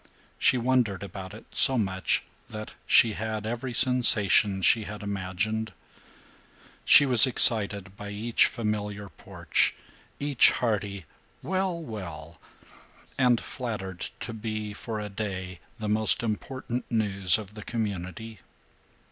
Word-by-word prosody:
She 130 - +3
wondered 120 -6 0
about 95 -1 -9
it - - -13
so 130 - +3
much 95 -4 -1 0.3
that 110 0 -8
she 115 -3 +5
had 110 0 -5
every 120 +3 -4
sensation 115 -5 +3
she 110 +5 +3
had 105 0 -8
imagined. 100 +3 -3 1.1
She 145 - +8
was 125 -3 +8
excited 100 -6 +4
by 105 - -8
each 110 +3 +1
familiar 105 -3 -4
porch, - - -1 0.4
each 145 -3 +4
hearty 100 -5 -3 0.4
"Well, 185 -2 -2
well!" 85 - -9 0.8
and 125 -3 +3
flattered 100 -8 -6
to 115 - -6
be, 110 -1 -5
for 110 +1 -6
a 105 - -5
day, 95 -3 -6 0.2
the 105 - -5
most 110 +2 +1
important 120 +3 -5
news 100 -5 +3
of 105 -2 -10
the 105 - -10
community. 105 -1 -5
110 Hz, 120 wpm, -26 LUFS, 100-115 Hz, 1.1 s, She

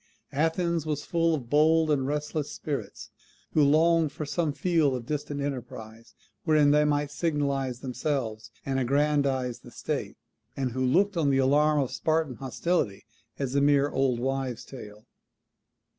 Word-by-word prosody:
Athens 165 +2 0
was 150 -1 -3
full 165 -1 +1
of 130 -6 -6
bold 155 +3 +4
and 135 -3 +1
restless 150 0 -2
spirits, 145 -3 -5 0.4
who 155 - +4
longed 160 +2 +4
for 155 - -5
some 160 +1 -1
field 155 -3 +1
of 120 -2 -6
distant 145 0 -3
enterprise, 115 -5 -7 0.3
wherein 155 -3 +4
they 150 +1 +4
might 145 -1 0
signalize 140 -5 -1
themselves, 125 -5 -3 0.2
and 135 -1 0
aggrandize 135 -2 +1
the - - -14
state; - - -4 0.4
and 130 -2 -1
who 130 +2 -2
looked 185 +9 +2
on 150 -4 +2
the 135 - +2
alarm 145 +3 +3
of 135 -3 -1
Spartan 150 +1 0
hostility 135 - -2 0.3
as 135 -2 -3
a 140 - +2
mere 145 0 +3
old 130 -3 +1
woman's 130 -2 -2
tale. 105 -4 -11
145 Hz, 150 wpm, -27 LUFS, 130-155 Hz, 0.4 s, bold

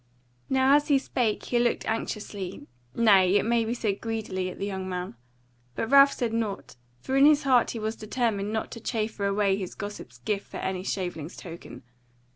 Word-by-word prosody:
Now 265 +1 +4
as 295 0 +2
he 285 -3 +5
spake 240 -5 -1
he 240 - +1
looked 240 0 +1
anxiously, 210 -4 -4 0.3
nay, 195 -5 +5
it 205 - +3
may 235 0 +2
be 230 +2 -2
said 205 -4 -2
greedily, 215 -5 -3
at - - -9
the 195 - -3
young 190 -2 -4
man. 180 -3 -4 0.6
But 225 - -3
Ralph 280 0 +8
said 235 -3 -2
nought; 215 - -3 0.3
for 265 - -2
in 275 +2 +7
his 300 0 +4
heart 255 -3 +4
he - - -4
was 220 0 -3
determined 215 -2 -1
not 220 0 -3
to 230 - -7
chaffer 215 -2 -2
away 200 -1 +2
his 185 -3 -6
gossip's 205 0 -8
gift 205 -2 -3
for - - -8
any 185 -1 -3
shaveling's 175 -4 -4
token. 170 -1 -10
215 Hz, 190 wpm, -27 LUFS, 195-240 Hz, 0.6 s, Ralph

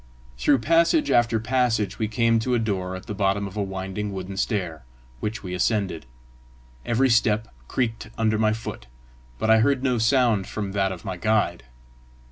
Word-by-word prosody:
Through 135 - +3
passage 170 - +3
after 115 -1 +3
passage 115 -2 0
we 110 - 0
came 115 +1 +2
to 125 +2 0
a - - +3
door 95 -5 -2
at 95 - -9
the - - -5
bottom 100 0 0
of 95 0 -8
a 105 - -1
winding 95 +1 -4
wooden 95 0 -6
stair, 95 -6 -2 0.4
which 105 - -4
we 90 -2 -5
ascended. 95 - -1 0.8
Every 125 +3 +2
step 110 -1 +2 0.2
creaked 115 -4 -2
under 110 -1 +1
my 110 -1 +3
foot, 110 - -7 0.5
but 110 - +1
I 110 - +6
heard 130 +3 +2
no 125 -3 +1
sound 115 -4 +2
from 100 -2 -4
that 95 -1 0
of 90 -3 -8
my 95 -2 -4
guide. 90 - 0
110 Hz, 175 wpm, -24 LUFS, 95-115 Hz, 0.8 s, I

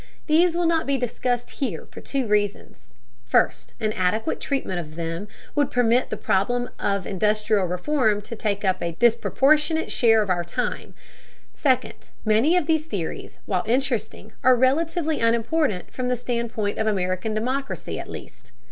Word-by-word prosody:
These 335 +2 +4
will 345 0 +1
not 330 -2 +1
be 280 -1 +2
discussed 245 0 -2
here, 215 - -3
for - - -10
two 275 -2 -2
reasons: 205 -1 -2 0.3
first, - - +1
an 215 -2 0
adequate 200 - 0
treatment 265 -10 -2
of 155 -2 -8
them 165 +4 -4 0.3
would 290 -2 +2
permit 245 0 +2
the 215 - -3
problem 245 +7 0
of 200 -2 0
industrial 210 0 +1
reform 215 - +1
to 230 - -7
take 205 -2 -2
up 185 -1 +1
a 170 0 -2
disproportionate 280 - +2
share 225 -3 +4
of 195 - -2
our 175 -1 +1
time; 240 +9 -4 0.6
second, 260 -3 0 0.2
many 225 +11 +4
of 350 - +1
these 315 0 +1
theories, 185 - -5
while 185 -3 0
interesting, 240 -3 -1
are 255 0 +6
relatively 315 +5 +1
unimportant, 230 - +1
from 255 -1 -2
the 250 - +1
standpoint 235 -4 -2
of 220 - 0
American 185 +1 -1
democracy 260 +5 -3
at - - -7
least. - - -10
230 Hz, 155 wpm, -24 LUFS, 205-270 Hz, 0.6 s, are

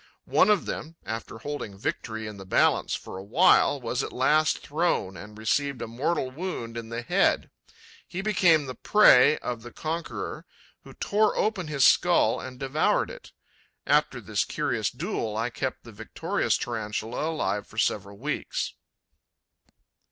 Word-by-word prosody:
One - - +4
of 210 -2 +3
them, 160 +2 -5
after 110 0 -5
holding 110 -5 -6
victory 110 +2 -4
in 105 -1 -7
the 95 - -9
balance 95 - +2
for - - -8
a - - -8
while, 145 - +4
was 125 +1 -2
at - - -4
last 155 +4 +3
thrown 150 - 0
and 105 +2 -10
received 135 +5 0
a - - -3
mortal 130 +3 -1
wound 130 -7 -5
in 115 -1 -6
the 115 +1 -4
head. - - +2 0.6
He 190 +2 -5
became 175 -7 +4
the 130 - -5
prey 150 -6 +6
of 120 -2 -3
the 120 +1 -10
conqueror, 165 +5 -5 0.4
who - - -13
tore 210 +1 +1
open 205 -6 0
his 140 -3 +3
skull 175 -10 +4
and 130 -1 -9
devoured 135 +3 +1
it. - - -12 0.5
After - - +2
this - - -1
curious - - -1
duel, 110 -1 -3
I 115 +2 -1
kept 130 +4 -4
the 115 - -11
victorious 115 +1 -1
Tarantula 115 +5 -3
alive 105 -11 -2
for - - -16
several 100 0 -1
weeks.' 150 +7 -3
125 Hz, 155 wpm, -26 LUFS, 110-155 Hz, 0.6 s, prey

